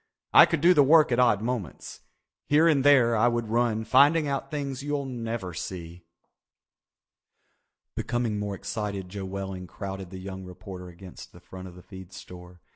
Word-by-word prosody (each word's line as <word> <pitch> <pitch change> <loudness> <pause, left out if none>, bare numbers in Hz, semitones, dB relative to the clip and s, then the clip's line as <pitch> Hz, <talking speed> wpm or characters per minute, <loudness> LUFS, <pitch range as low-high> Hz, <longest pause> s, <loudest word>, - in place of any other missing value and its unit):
I - - +9
could 165 - -2
do 175 +3 +6
the 150 - +5
work 150 +1 +5
at 120 - +1
odd 110 -4 +3
moments. 115 -8 -5 0.5
Here 155 +3 +4
and 145 -5 +3
there 130 -5 +5
I 110 +2 +3
would 120 -2 -1
run 115 -1 0
finding 145 +6 +4
out 140 0 -3
things 140 -3 -4
you'll 145 0 -3
never 115 -7 -5
see." 85 0 -8 1.9
Becoming 120 -3 -2
more 100 -1 -4
excited 100 -1 -5
Joe 100 0 -6
Welling 95 -1 -6
crowded 95 -1 -7
the 95 - -9
young 95 0 -8
reporter 90 0 -10
against 90 +1 -13
the - - -14
front 95 0 -11
of 90 - -13
the 90 - -14
feed 95 -1 -12
store. 90 -2 -12
105 Hz, 170 wpm, -26 LUFS, 95-130 Hz, 1.9 s, I